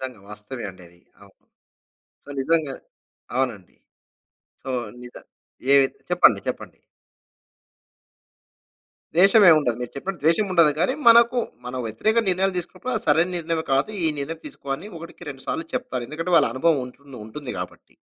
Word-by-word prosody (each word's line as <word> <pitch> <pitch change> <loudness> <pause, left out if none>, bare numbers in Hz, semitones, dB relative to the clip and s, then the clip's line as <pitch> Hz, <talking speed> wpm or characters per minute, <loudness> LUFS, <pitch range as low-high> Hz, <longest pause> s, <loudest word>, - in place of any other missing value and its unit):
నిజంగా 125 -6 -6
వాస్తవమే 105 +4 -8
అండి 95 -1 -16
అది. 85 +1 -23 0.2
అవును. 100 -1 -21 0.8
సో - - -20
నిజంగా. 155 -1 +1 0.6
అవునండి. 120 -8 -2 0.9
సో 135 - -6 0.3
నిజ 125 0 -11 0.6
ఏవి 135 -1 +6 0.2
చెప్పండి. - - +5
చెప్పండి. - - -6 2.4
ద్వేషం 195 +4 +6
ఏమి 160 - +8
ఉండదు. 120 -5 -1
మీరు 125 - -5
చెప్పినట్టు 180 +4 -5
ద్వేషం 170 +6 +3
ఉండదు. 170 -4 +5
కానీ, 220 +10 +2
మనకు 235 +1 +6 0.3
మన 125 - -6
వ్యతిరేక 220 - 0
నిర్ణయాలు 190 +1 +1
తీసుకున్నప్పుడు, 185 +8 -5
అది - - -4
సరైన 165 +5 +4
నిర్ణయంమ 165 -1 -2
కాదు. 135 +10 +2
ఈ - - +3
నిర్ణయం 160 +3 -5
తీసుకో 135 - -10
అని 190 +8 -10
ఒకటికి 165 -2 -10
రెండు 135 -1 -8
సార్లు 325 +1 -2
చెప్తారు. 250 - -3
ఎందుకంటే, 165 +4 -3
వాళ్ళ 145 -6 +5
అనుభవం 150 +1 +2
ఉంటుంది 135 0 -13
ఉంటుంది 130 +4 -7
కాబట్టి. 90 - -8
155 Hz, 145 wpm, -23 LUFS, 130-180 Hz, 2.4 s, ఏమి